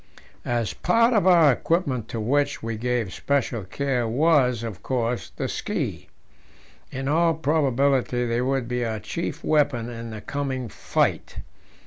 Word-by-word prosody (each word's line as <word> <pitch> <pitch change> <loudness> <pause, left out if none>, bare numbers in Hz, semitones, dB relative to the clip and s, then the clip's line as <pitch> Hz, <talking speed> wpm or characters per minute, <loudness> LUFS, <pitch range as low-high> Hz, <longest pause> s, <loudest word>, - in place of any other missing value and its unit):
A 120 -1 0 0.2
part 230 +2 +4
of 205 -5 +3
our 170 -5 +7
equipment 130 - 0
to 115 - -5
which 140 +6 0
we 115 0 -3
gave 115 -4 -1
special 130 -6 -1
care 125 +3 -1
was, 125 -2 +3
of 110 -5 -6
course, 120 -2 -2
the - - -2
ski; - - -3 0.8
in 135 +1 -4
all 165 +2 +3
probability 135 -5 +1
they 120 0 0
would 130 -1 0
be 125 0 -1
our 110 -2 -2
chief 160 +8 -5
weapon 145 -6 +1
in 115 0 -7
the 110 -1 -7
coming 130 0 -3
fight. - - -1
125 Hz, 145 wpm, -24 LUFS, 115-145 Hz, 0.8 s, our